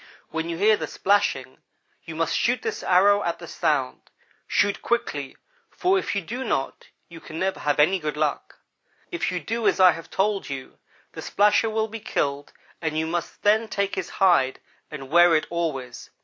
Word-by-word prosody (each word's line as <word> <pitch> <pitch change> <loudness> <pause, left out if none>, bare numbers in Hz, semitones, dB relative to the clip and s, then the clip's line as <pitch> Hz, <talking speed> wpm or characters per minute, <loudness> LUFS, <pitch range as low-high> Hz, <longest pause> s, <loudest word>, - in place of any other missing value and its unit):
When 160 +1 -3
you 165 - -3
hear 210 +3 +4
the - - -4
splashing, 205 +1 0 0.5
you - - -7
must - - 0
shoot - - +1
this 445 -1 -3
arrow 200 +3 +4
at 170 -3 -2
the - - -10
sound. 65 - -1 0.4
Shoot 205 -1 +1
quickly, 150 - -2 0.3
for 375 +1 +1
if 370 - -3
you 200 - -1
do 245 +9 -5
not 135 - -3 0.2
you 165 -1 -12
can 160 - -9
never 190 +2 -1
have 145 0 0
any 180 +6 +4
good 150 -2 -4
luck. 150 -2 -2 0.5
If 345 - -1
you 180 - -2
do 225 +8 -2
as - - +2
I 185 -1 +8
have 165 -1 -8
told 195 -2 -1
you 135 -2 -7 0.3
the - - -8
splasher 210 +2 +2
will 220 0 -1
be 225 +1 -7
killed 140 -7 -2 0.3
and 160 -2 -2
you 160 - 0
must 170 +1 -4
then 220 +2 +3
take 200 -2 -2
his - - -3
hide 135 -9 +2 0.3
and 135 -3 -9
wear 175 0 +6
it 155 - +1
always. 135 -8 -4
175 Hz, 190 wpm, -24 LUFS, 155-205 Hz, 0.5 s, I